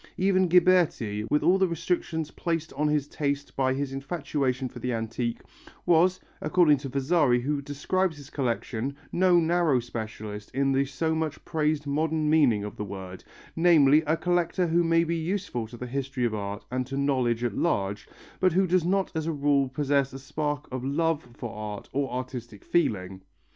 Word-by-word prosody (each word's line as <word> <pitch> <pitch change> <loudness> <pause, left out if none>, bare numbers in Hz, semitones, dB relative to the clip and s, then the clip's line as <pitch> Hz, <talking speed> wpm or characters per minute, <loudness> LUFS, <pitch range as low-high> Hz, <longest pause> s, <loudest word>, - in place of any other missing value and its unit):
Even 185 0 +3
Ghiberti, 165 - +3
with 150 - +2
all 185 +2 +4
the 190 - +4
restrictions 165 -2 -2
placed 165 -2 -3
on 150 +2 0
his 150 -1 +1
taste 145 -1 -3
by 130 -1 +1
his 140 -1 -3
infatuation 135 -3 -2
for 125 0 -10
the 125 +1 -2
antique, 115 +1 -3 0.4
was, 180 +2 +4 0.2
according 155 -2 +4
to 135 0 -6
Vasari 135 -2 +2
who 145 +2 -1
describes 160 +5 -1
his 140 -2 -12
collection, 125 0 -2 0.2
no 180 -1 +4
narrow 165 -5 +2
specialist 110 -3 -6
in 135 0 +2
the 135 +1 +2
so 145 +4 -1
much 160 -1 -3
praised 155 -1 0
modern 155 +1 0
meaning 130 -10 +4
of 105 - -7
the - - -3
word, 95 -2 -8 0.3
namely, 155 -4 +5
a 160 +2 +2
collector 175 +1 +1
who 170 +1 +2
may 165 0 +3
be 170 0 -1
useful 165 - -2
to 120 +2 -11
the 125 - -6
history 135 0 -2
of 115 - 0
art 100 0 -4
and 130 0 -2
to 135 +1 -4
knowledge 130 -4 +1
at 120 - -1
large, 100 -11 -1 0.3
but 185 -2 +3
who 190 +2 +3
does 180 -1 +2
not 190 +2 +1
as 160 0 -2
a - - +1
rule 140 -2 +2
possess 140 0 +1
a - - -6
spark 145 +2 -3
of 130 -1 -4
love 160 +3 0 0.2
for 120 - -6
art 105 -1 -6
or 140 0 -1
artistic 125 -4 -6
feeling. 95 - 0
145 Hz, 180 wpm, -27 LUFS, 125-165 Hz, 0.4 s, namely